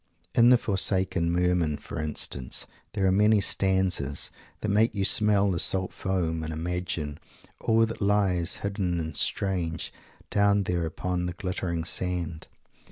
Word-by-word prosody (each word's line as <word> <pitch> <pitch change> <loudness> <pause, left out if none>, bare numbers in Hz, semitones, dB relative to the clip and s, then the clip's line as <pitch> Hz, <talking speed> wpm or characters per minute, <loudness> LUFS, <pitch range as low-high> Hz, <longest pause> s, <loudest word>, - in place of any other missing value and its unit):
In 120 0 +6
"The 125 - +7
Forsaken 95 -5 +1
Merman" 90 -3 +1
for 70 - -6
instance, 70 -4 -3 0.3
there 100 -2 0
are 95 - +4
many 105 +2 +4
stanzas 95 -8 +1 0.3
that 105 - -1
make 110 +2 +3
you 100 -1 0
smell 100 -1 +3
the 85 - -1
salt 95 +2 +1
foam 85 -4 -1
and 80 0 -4
imagine 80 -2 -3 0.4
all 115 0 +3
that 115 0 -7
lies, 100 -4 +2
hidden 95 -4 -1
and 80 -2 -4
strange, 90 -4 -1 0.4
down 100 0 +3
there 90 -3 -1
upon 90 +2 -2
the 90 - -3
glittering 90 -2 -3
sand. 85 -2 -3
90 Hz, 145 wpm, -27 LUFS, 85-100 Hz, 0.4 s, The